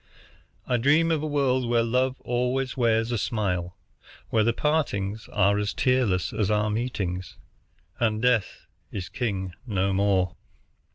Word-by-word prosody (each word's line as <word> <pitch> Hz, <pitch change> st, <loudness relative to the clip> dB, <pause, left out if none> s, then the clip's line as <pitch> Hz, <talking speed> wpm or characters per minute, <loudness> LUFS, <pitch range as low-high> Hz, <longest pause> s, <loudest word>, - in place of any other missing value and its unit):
I 125 Hz, -, +1 dB
dream 150 Hz, +7 st, +3 dB
of 160 Hz, -2 st, +1 dB
a 155 Hz, -, -2 dB
world 130 Hz, -4 st, +1 dB
where 120 Hz, -1 st, +3 dB
love 125 Hz, +3 st, 0 dB
always 125 Hz, +2 st, -1 dB
wears 115 Hz, -2 st, +2 dB
a 120 Hz, -, 0 dB
smile, 90 Hz, -5 st, -2 dB, 0.5 s
where 110 Hz, -1 st, +3 dB
the 115 Hz, -, +3 dB
partings 110 Hz, -8 st, -1 dB
are 100 Hz, 0 st, +3 dB
as 105 Hz, 0 st, -2 dB
tearless 125 Hz, -8 st, +1 dB
as 105 Hz, -3 st, 0 dB
our 105 Hz, 0 st, +1 dB
meetings, 95 Hz, -6 st, -3 dB, 0.6 s
and 110 Hz, -3 st, +1 dB
death 120 Hz, -4 st, +1 dB, 0.3 s
is 90 Hz, -4 st, -5 dB
king 95 Hz, -7 st, -3 dB
no 100 Hz, -2 st, 0 dB
more. 95 Hz, -2 st, +1 dB
115 Hz, 145 wpm, -26 LUFS, 100-125 Hz, 0.6 s, dream